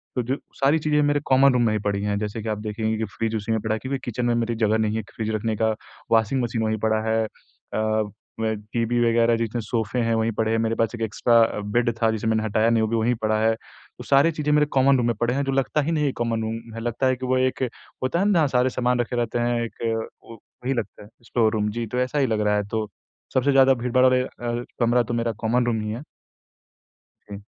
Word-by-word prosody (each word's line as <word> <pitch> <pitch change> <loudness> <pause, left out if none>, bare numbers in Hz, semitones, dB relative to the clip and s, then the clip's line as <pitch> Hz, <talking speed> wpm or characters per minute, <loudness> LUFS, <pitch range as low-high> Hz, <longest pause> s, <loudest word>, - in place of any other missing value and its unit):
तो 125 - +1
जो 130 +4 -1 0.2
सारी 140 +4 +3
चीज़ें 150 -1 +2
मेरे 145 0 +2
कॉमन 135 0 +5
रूम 125 - +2
में 110 - +2
ही 105 - 0
पड़ीं 100 -1 -1
हैं, 100 -1 0
जैसे 105 +1 -4
कि 110 - -4
आप 105 - -1
देखेंगे 110 +1 -2
कि 110 - -2
फ़्रिज 110 +2 -3
उसी 110 +1 -3
में 110 - +1
पड़ा 110 0 -1
है - - -5
क्योंकि 135 +1 -3
किचन 120 0 -2
में 120 - +2
मेरी 115 0 -1
जगह 110 -1 +2
नहीं 110 0 0
है 110 - -3
क 95 - -19
फ़्रिज 110 -1 -3
रखने 110 0 -1
का, 110 +1 +1 0.4
वाशिंग 115 +3 +3
मशीन 115 -1 -2
वहीं 110 0 0
पड़ा 110 0 +2
है 110 0 +2
अ - - -5 1.1
अ, 110 0 0 0.2
टीवी 120 0 +1
वगैरह, 115 0 +3
जितने 115 +1 -2
सोफ़े 110 +2 -2
हैं 115 0 +1
वहीं 110 +1 +1
पड़े 110 0 +1
हैं, 115 - +2
मेरे 115 0 0
पास 115 +1 0
1 115 - -9
एक्स्ट्रा 115 +2 +1
अ, 110 - -1
बेड़ 120 +4 +1
था 115 - +4
जिसे 110 0 -3
मैंने 110 0 +1
हटाया 110 +1 +2
नहीं 115 -1 +3
वो - - +1
भी 115 - 0
वहीं 115 +2 +2
पड़ा 110 0 +1
है। 110 0 +4
तो - - -16
सारी 140 +4 +4
चीज़ें 150 -1 -2
मेरे 150 0 +4
कॉमन 135 0 +5
रूम 120 - 0
में 120 - +1
पड़े 120 +1 +1
हैं 140 +1 0
जो 135 - -1
लगता 135 +3 +1
ही 160 +4 -1
नहीं 150 -2 +1
है 135 - +1
कॉमन 115 -1 0
रूम 115 +1 -5
है, 115 - -5
लगता 120 +3 0
है 130 - +2
कि 130 +1 -6
वो 130 0 +1
एक 130 0 0 0.4
होता 150 +7 0
है 195 - +2
ना 205 - +3
जहाँ 155 -3 +4
सारे 125 0 +2
सामान 125 0 0
रखे 120 +1 -1
रहते 120 0 -1
हैं 120 0 0
एक 115 - -6 0.5
वो 115 - -11 0.3
वही 135 +2 0
लगता 110 -3 -5
है, 105 - -15 0.2
स्टोर 115 -3 +2
रूम 105 -1 0
जी 115 +1 -3
तो 125 +3 -2
ऐसा 130 +3 0
ही 135 - +3
लग 110 -1 0
रहा 105 0 +2
है। 105 - +1
तो 110 0 -2 0.5
सबसे 130 +2 +2
ज़्यादा 135 0 +6
भीड़भाड़ 125 +1 +1
वाले 130 0 +4
अ, 120 -1 -4
कमरा 120 +1 +3
तो 120 - -5
मेरा 115 0 0
कॉमन 120 +2 +1
रूम 115 -2 0
ही 105 0 -3
है। 120 +6 -5 1.3
हुँ। 100 0 -7
115 Hz, 265 wpm, -24 LUFS, 110-125 Hz, 1.3 s, ज़्यादा